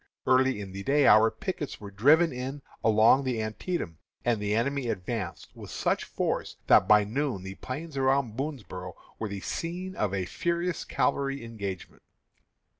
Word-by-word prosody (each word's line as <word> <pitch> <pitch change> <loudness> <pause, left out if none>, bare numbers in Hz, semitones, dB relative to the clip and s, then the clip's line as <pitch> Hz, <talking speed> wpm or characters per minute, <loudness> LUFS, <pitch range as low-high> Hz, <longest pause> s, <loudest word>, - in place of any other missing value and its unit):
Early 130 -2 +3
in 100 -2 -7
the 95 +1 -6
day 140 +5 +3
our 110 0 +7
pickets 160 - -5
were 100 -1 -9
driven 150 - +4
in 135 +3 -5 0.2
along 110 +5 +5
the 125 -3 -1
Antietam, 110 - -3 0.3
and 120 -3 +1
the 105 0 0
enemy 135 +2 0
advanced 95 -2 -4
with - - -10
such - - 0
force - - -2
that - - +6
by 105 -1 +6
noon 120 -2 -2
the 95 0 -6
plains 145 +9 -7
around 135 -4 +1
Boonsboro' 125 - -5 0.2
were 110 - -3
the 100 -1 -5
scene 180 - -4
of 105 -3 0
a 95 -2 -1
furious 170 - -2
cavalry 140 -2 0
engagement. 100 -5 -6
120 Hz, 160 wpm, -28 LUFS, 105-140 Hz, 0.3 s, our